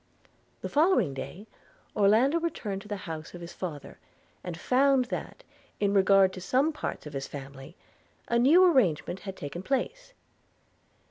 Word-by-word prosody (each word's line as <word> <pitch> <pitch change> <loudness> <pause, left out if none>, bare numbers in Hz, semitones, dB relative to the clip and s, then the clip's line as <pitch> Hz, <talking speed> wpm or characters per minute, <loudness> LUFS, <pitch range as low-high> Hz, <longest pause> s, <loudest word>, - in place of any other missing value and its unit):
The - - -3
following 290 - +2
day 175 +9 -7 0.5
Orlando 225 +10 +4
returned 215 -12 -3
to 210 - -13
the 210 - -3
house 160 0 -7
of 175 - -9
his 170 - -8
father, 155 -6 -7 0.4
and 175 -2 -6
found 265 +4 +3
that, - - -6 0.4
in 200 -1 +1
regard 195 -1 +5
to 185 - -8
some 265 - +1
parts 295 - -5
of 150 - -8
his 135 0 -4
family, 135 +2 -10 0.5
a 235 - +2
new 305 +10 +6
arrangement 195 - +2
had 195 -1 -8
taken 145 +5 -6
place. 480 - -3
200 Hz, 150 wpm, -28 LUFS, 170-270 Hz, 0.5 s, new